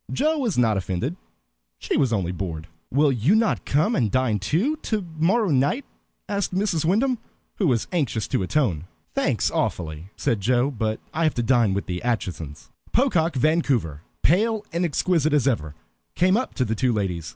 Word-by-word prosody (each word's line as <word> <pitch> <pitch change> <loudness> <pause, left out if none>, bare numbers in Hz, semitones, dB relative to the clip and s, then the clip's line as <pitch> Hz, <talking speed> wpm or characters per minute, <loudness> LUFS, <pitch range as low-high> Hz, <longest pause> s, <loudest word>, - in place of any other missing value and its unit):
Joe 310 +3 +1
was 235 - -1
not 110 -4 +3
offended; 95 - -2 0.6
she - - -2
was 135 -5 +2
only 95 -6 0
bored. 85 -4 -5 0.2
"Will 145 +2 +3
you 130 - +2
not 220 0 +1
come 155 - +2
and 115 -7 +1
dine 125 -3 +1
too, 175 - 0
to 215 -9 -2
morrow 195 +6 +3
night?" 145 - +1 0.4
asked 200 -2 -2
Mrs. 185 -5 0
Wyndham, 225 +9 +2 0.4
who 195 - +2
was 120 -5 +1
anxious 140 - -1
to - - 0
atone. 95 - 0 0.3
"Thanks, - - +1
awfully," 80 +1 -2
said 110 -4 -1
Joe, 125 +6 +2
"but 110 -3 -2
I 165 - 0
have 155 - +1
to 120 - 0
dine 115 -5 +3
with 100 - -2
the 90 -1 -4
Aitchisons." 90 -11 -4 0.2
Pocock 180 - +2
Vancouver, 130 - +1 0.2
pale 215 +6 +2
and 170 +1 0
exquisite 160 -1 +1
as 145 -2 +3
ever, 80 - -1 0.4
came 185 +2 +3
up 250 +3 -2
to 125 - +1
the 110 - -1
two 125 +3 +1
ladies. 90 -7 -2
135 Hz, 175 wpm, -24 LUFS, -, 0.6 s, not